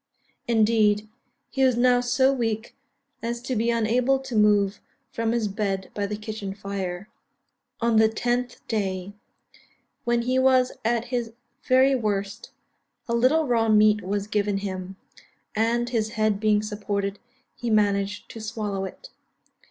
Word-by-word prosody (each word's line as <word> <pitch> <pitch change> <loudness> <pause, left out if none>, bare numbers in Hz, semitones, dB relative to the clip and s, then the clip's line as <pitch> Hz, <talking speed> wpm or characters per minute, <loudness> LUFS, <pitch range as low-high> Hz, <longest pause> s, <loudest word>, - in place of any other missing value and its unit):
Indeed, 215 -2 +3 0.4
he 270 - +1
was 255 -2 +3
now 245 0 +4
so 260 +2 +3
weak 225 -3 -2 0.5
as 235 +1 -3
to 255 0 -2
be 230 +1 +1
unable 235 +3 +2
to 265 -2 -7
move 205 -1 +3 0.3
from 230 0 -1
his 230 -2 0
bed 195 -2 -3
by 205 -1 -2
the 210 +1 -4
kitchen 215 -2 -6
fire. 200 -2 -5 0.7
On 230 -1 +3
the 220 0 +5
10th 245 +2 -2
day, 195 -3 -2 0.9
when 235 0 +1
he 255 +2 +1
was 260 -1 +4
at 235 +1 +1
his 235 -2 -2 0.3
very 260 +1 +4
worst, 210 -2 -2 0.6
a 235 - -1
little 260 +7 +3
raw 230 -3 +2
meat 215 0 +5
was 200 +2 -2
given 205 -1 0
him; 190 -1 -5 0.6
and, 235 +2 +1
his 220 -2 -1
head 215 -2 +1
being 210 -1 +2
supported, 205 -1 -3 0.4
he 240 - -4
managed 205 -1 +1
to 225 - -8
swallow 210 -3 -3
it. - - -10
220 Hz, 145 wpm, -25 LUFS, 205-240 Hz, 0.9 s, the